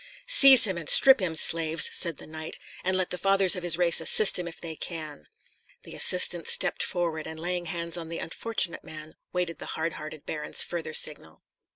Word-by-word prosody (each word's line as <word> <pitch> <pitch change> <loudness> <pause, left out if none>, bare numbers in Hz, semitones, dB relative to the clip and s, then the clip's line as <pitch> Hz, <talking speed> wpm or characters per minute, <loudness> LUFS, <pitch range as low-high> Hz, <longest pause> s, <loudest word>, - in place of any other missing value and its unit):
"Seize 275 - +7
him, 190 -4 -4
and 160 - -7
strip 265 -3 +6
him, 175 -4 -4
slaves!" 165 0 +3
said 170 -5 -2
the - - -13
knight, 155 0 -8 0.3
"and 185 0 -2
let 185 -1 -4
the 180 - -5
fathers 195 -1 +2
of 180 - -7
his 175 -2 0
race 175 -2 +5
assist 215 -3 +5
him 175 - -6
if 165 - -10
they 165 -2 -9
can." 155 - -8 0.6
The - - -12
assistants 175 -2 0
stepped - - -2
forward, 165 -3 -4
and 160 0 -9
laying 175 +1 -5
hands 170 -1 -6
on 165 -1 -9
the 165 - -7
unfortunate 205 -1 -4
man, 155 0 -12 0.2
waited 180 -2 -5
the - - -8
hardhearted 155 -2 -7
baron's 150 - -1
further 165 -2 -6
signal. 80 - -2
170 Hz, 195 wpm, -25 LUFS, 160-180 Hz, 0.6 s, Seize